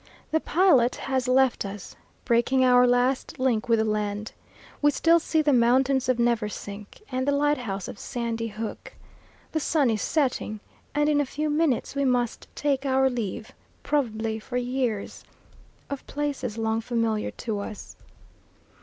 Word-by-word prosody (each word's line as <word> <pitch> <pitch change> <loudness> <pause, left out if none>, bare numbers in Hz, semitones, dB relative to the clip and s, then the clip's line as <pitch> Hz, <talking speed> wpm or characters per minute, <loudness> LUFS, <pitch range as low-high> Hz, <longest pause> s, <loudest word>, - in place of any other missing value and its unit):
The 320 - +3
pilot 310 -10 +3
has 260 -2 -2
left 260 0 +3
us, 200 -1 -8 0.3
breaking 255 +2 +3
our 250 0 +6
last 245 +2 +1
link 245 -3 0
with 230 - +5
the 220 - +1
land. 210 0 -2 0.5
We 295 - +5
still 330 +4 +4
see 315 -1 +1
the 295 -2 +3
mountains 255 +2 +3
of 255 - +3
Neversink, 210 - -2
and 260 +1 -1
the - - +4
lighthouse 270 -9 0
of - - -8
Sandy 235 -2 -3
Hook. 220 0 -7 0.6
The 315 - 0
sun 290 -5 +2
is 215 - -1
setting, 255 -7 -1 0.4
and 295 0 +2
in 295 -1 +3
a - - +2
few 300 +3 -2
minutes 300 -5 +1
we 280 0 0
must 245 -3 0
take 280 -2 0
our 265 -1 +2
leave, 230 0 -4 0.3
probably 225 -6 -1
for 245 +3 -5
years, 245 -4 -2 0.6
of 280 -1 -6
places 280 -6 -3
long 225 0 0
familiar 230 -2 -1 0.2
to 215 -3 -1
us. 205 +1 -8
250 Hz, 155 wpm, -26 LUFS, 225-275 Hz, 0.6 s, our